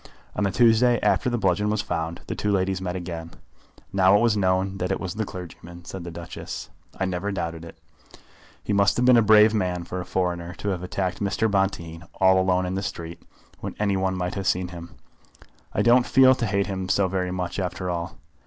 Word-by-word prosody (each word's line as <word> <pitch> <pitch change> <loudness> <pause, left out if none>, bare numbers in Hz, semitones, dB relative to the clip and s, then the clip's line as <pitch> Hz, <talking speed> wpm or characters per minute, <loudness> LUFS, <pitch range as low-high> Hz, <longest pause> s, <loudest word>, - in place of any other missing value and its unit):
On - - -1
the - - +2
Tuesday 120 +2 +4
after - - +2
the 120 - -1
bludgeon 105 0 +1
was 105 0 0
found, 85 -4 -3
the - - -4
two 105 - -1
ladies 95 -1 0
met 90 -1 -3
again. 85 -2 -6 0.6
"Now 95 0 +5
it - - +1
was 115 -2 +3
known 95 0 0
that 90 +1 -1
it - - -1
was 90 -2 -4
the 110 +1 -2
clergyman," 85 -1 -10
said 95 0 -7
the 85 - -6
Duchess. 85 0 -7 0.3
"I 95 - +1
never 95 +2 -2
doubted 85 -3 -4
it." 85 -1 -11 0.9
"He 105 - -2
must 100 0 +3
have 125 - +2
been 125 -1 +7
a 115 - +6
brave 110 0 +6
man 90 -4 -1
for 90 +2 -5
a - - -7
foreigner, 90 -1 -2
to 105 - -4
have 90 -3 -2
attacked 90 +1 -3
Mr. 100 +2 0
Bonteen 85 -4 -1
all 95 0 +4
alone 95 0 +2
in 90 - -3
the 95 - -2
street, 85 -3 -6 0.4
when - - -6
any 100 -2 +1
one 95 0 0
might 90 0 -2
have 95 -2 -3
seen 90 0 0
him. 85 -1 -10 0.8
I - - 0
don't 120 +1 +5
feel 130 -1 +6
to 120 -3 -2
hate 100 0 +1
him 95 -2 -4
so 100 0 +3
very 90 0 -2
much 90 0 -3
after 90 0 -3
all. 85 +4 -4
95 Hz, 220 wpm, -24 LUFS, 90-100 Hz, 0.9 s, been